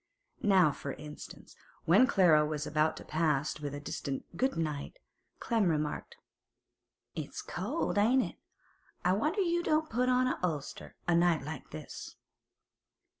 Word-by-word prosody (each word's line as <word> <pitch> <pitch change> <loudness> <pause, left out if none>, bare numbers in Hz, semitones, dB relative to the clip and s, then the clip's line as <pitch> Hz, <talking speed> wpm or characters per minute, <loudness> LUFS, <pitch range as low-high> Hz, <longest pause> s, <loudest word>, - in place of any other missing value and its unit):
Now, 190 -7 +5
for 140 -1 -6
instance, 150 0 -10 0.3
when 255 - +6
Clara 175 - +5
was 150 -1 -2
about 155 +1 +1
to - - -9
pass 150 -2 0
with 145 -1 -4
a - - -5
distant 140 -1 -4
'Good 260 +3 0
night,' 155 - -3 0.4
Clem 225 -6 +1
remarked: 155 - -2 1.0
'It's - - -5
cold, - - -1
ain't 245 +5 +4
it? - - -7 0.7
I 180 - +4
wonder 305 - +1
you 345 -2 +1
don't 310 -1 +1
put 250 +3 +1
on 255 0 +3
a 255 - -1
ulster, 155 -6 -4
a 175 - +3
night 170 -3 +3
like 150 -1 -7
this. 75 - -8
170 Hz, 145 wpm, -31 LUFS, 150-250 Hz, 1.0 s, when